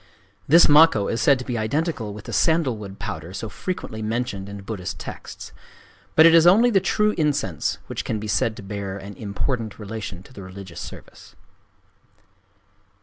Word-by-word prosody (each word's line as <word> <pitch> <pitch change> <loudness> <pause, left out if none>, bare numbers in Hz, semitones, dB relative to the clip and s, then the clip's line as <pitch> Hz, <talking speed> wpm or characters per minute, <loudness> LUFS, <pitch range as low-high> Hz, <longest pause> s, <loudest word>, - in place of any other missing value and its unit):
This 165 +4 +7
makkō 150 -9 +5
is 115 - -1
said 140 +3 +5
to 125 - -7
be 120 -3 -2
identical 115 0 -1
with 105 0 -10
the - - -7
sandalwood 120 -12 +1
powder 90 -4 -6
so 105 +3 -5
frequently 110 - -5
mentioned 110 -3 -3
in 100 -1 -8
Buddhist 95 -3 -5
texts. - - -9 0.6
But 160 - +8
it 165 - +8
is 165 0 +7
only 225 +7 +6
the 195 - +4
true 210 +2 +1
incense 145 - 0
which - - -5
can 110 - -2
be 105 - -6
said 110 +1 +1
to 105 - -10
bear 100 -1 -5
an 100 +1 -9
important 110 +3 -3
relation 100 -4 -7
to 130 - -17
the 100 - -10
religious 95 -2 -9
service. - - -11
110 Hz, 170 wpm, -23 LUFS, 100-150 Hz, 0.6 s, But